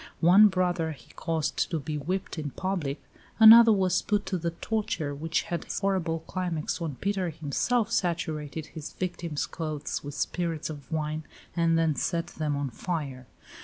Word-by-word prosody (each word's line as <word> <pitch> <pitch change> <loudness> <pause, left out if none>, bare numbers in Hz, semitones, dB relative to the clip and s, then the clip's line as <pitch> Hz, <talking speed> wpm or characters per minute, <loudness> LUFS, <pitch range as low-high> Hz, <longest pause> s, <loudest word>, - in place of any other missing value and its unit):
One 185 +5 +8
brother 180 -4 0
he 125 -5 -17
caused 160 -3 -1
to 165 - -1
be 150 +2 -4
whipped 180 +4 -3
in 150 -2 -3
public; 165 -4 -3 0.4
another 225 +1 +10
was 185 -3 +2
put 205 0 0
to 185 - -2
the 170 +1 -1
torture, 170 -4 -2
which 160 +4 -1
had 170 -2 -4
its - - -3
horrible 180 -5 0
climax 175 -2 -3
when 155 -5 -3
Peter 195 +2 -1
himself 200 - 0
saturated 160 -5 -1
his 155 -2 -9
victim's 170 -4 -3
clothes 155 -3 -4
with 145 0 -7
spirits 165 -3 -2
of 145 +1 -10
wine, 155 0 -2 0.3
and 165 -1 +3
then 165 -1 +2
set 170 +3 -1
them 155 -4 -3
on 140 -2 -2
fire. 135 -4 -4
165 Hz, 165 wpm, -28 LUFS, 150-185 Hz, 0.4 s, another